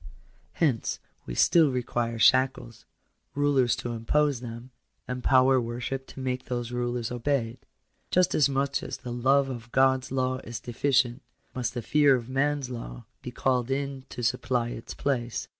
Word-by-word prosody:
Hence 135 -9 0 0.3
we - - -5
still 160 - +5
require 120 -2 -2
shackles; 130 -1 +2 0.5
rulers 140 -4 +2
to 120 - -5
impose 130 +3 +1
them; 120 +1 -8 0.4
and 125 0 -4
power 130 0 +5
worship 120 +3 -4
to - - -11
make 130 -1 -3
those 120 -1 -3
rulers 120 -1 -2
obeyed. 125 -1 -1 0.5
Just 180 0 +3
as 145 -2 +4
much 140 0 0
as - - -5
the 125 -2 -7
love 135 +3 +3
of 120 -3 -7
God's 130 -1 +2
law 130 -1 0
is 115 -2 -7
deficient, 125 +1 +1 0.3
must 125 -1 -3
the 120 - -3
fear 145 0 +4
of 120 -1 -5
man's 135 0 0
law - - -7 0.2
be - - -6
called 125 0 0
in 135 0 -2
to 120 - -6
supply 120 +1 0
its 115 - -7
place. 120 -4 -2
125 Hz, 160 wpm, -27 LUFS, 120-135 Hz, 0.5 s, still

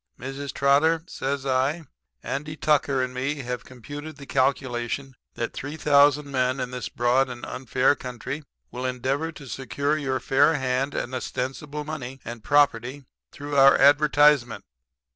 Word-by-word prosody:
"'Mrs. 135 +2 -5
Trotter,' 155 +4 +3
says 140 -5 -3
I, 135 +5 +1 0.4
'Andy 150 +3 -4
Tucker 140 -4 +2
and 130 0 -4
me 135 +3 -2
have 125 -3 -5
computed 145 +5 -9
the 140 - -10
calculation 130 -1 -1 0.2
that 115 - -3
3,000 145 0 +3
men 130 -1 0
in 125 - -3
this 125 -2 -5
broad 125 +2 +2
and 120 -1 -7
unfair 130 +1 +1
country 130 +3 -6 0.3
will 125 - -6
endeavor 130 +5 -1
to 150 -2 -11
secure 140 +3 -2
your 135 -4 -1
fair 145 +5 +3
hand 130 +1 -1
and 125 - -3
ostensible 135 +4 -4
money 135 -4 -6
and 115 -2 -7
property 140 -1 +2 0.3
through 145 0 -6
our 135 0 +7
advertisement. 145 -3 +4
135 Hz, 145 wpm, -25 LUFS, 130-145 Hz, 0.4 s, our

